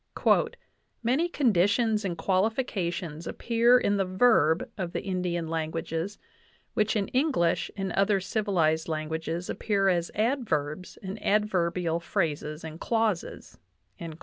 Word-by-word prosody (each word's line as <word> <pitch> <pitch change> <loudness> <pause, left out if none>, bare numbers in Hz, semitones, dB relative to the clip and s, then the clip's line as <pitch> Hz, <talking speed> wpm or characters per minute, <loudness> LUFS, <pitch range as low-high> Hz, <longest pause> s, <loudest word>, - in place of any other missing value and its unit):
"Many 270 +9 +2
conditions 220 - +2
and 175 -3 -3
qualifications 185 - -1
appear 235 +1 +3
in 205 -4 +1
the 195 - +2
verb 185 -4 +3
[of 180 -3 -4
the - - -3
Indian 180 -3 -2
languages] 165 +3 -3 0.6
which 215 -1 +1
in 200 -2 0
English 255 - +1
and 195 -2 -2
other 195 +1 +2
civilized 180 -6 0
languages 160 +2 -3
appear 200 -2 +1
as 170 -2 +1
adverbs 190 - -1
and 195 +2 -6
adverbial 180 -5 +1
phrases 155 -4 -2
and 160 0 -8
clauses." 225 - -2
185 Hz, 115 wpm, -27 LUFS, 165-215 Hz, 0.6 s, appear